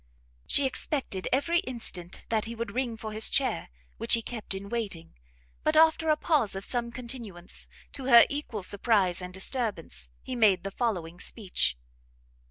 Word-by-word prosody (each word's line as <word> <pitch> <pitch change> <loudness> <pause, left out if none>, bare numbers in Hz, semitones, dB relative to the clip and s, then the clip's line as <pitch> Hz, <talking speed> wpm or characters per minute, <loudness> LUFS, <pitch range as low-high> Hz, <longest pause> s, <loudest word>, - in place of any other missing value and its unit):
She 285 - +3
expected 260 -7 -1
every 335 +6 +2
instant 220 - -6
that 220 -1 +1
he 230 +1 -5
would 230 -3 -4
ring 240 -2 -1
for 220 0 -6
his 220 +1 +5
chair, 270 -2 0 0.3
which - - +4
he 230 - -3
kept 220 -5 -3
in 195 +1 -6
waiting; 200 -7 -4 0.5
but, 310 0 +2
after 320 0 +5
a 305 - +5
pause 290 - +2
of 195 - -2
some 240 -1 -2
continuance, 235 -8 -6 0.2
to 270 - -3
her 235 -3 +9
equal 265 -8 -4
surprise 195 -3 +2
and 180 0 -6
disturbance, 190 - -2
he 255 - -4
made 205 -6 +4
the 195 - -4
following 180 -8 -2
speech. 185 - 0
225 Hz, 165 wpm, -28 LUFS, 195-255 Hz, 0.5 s, her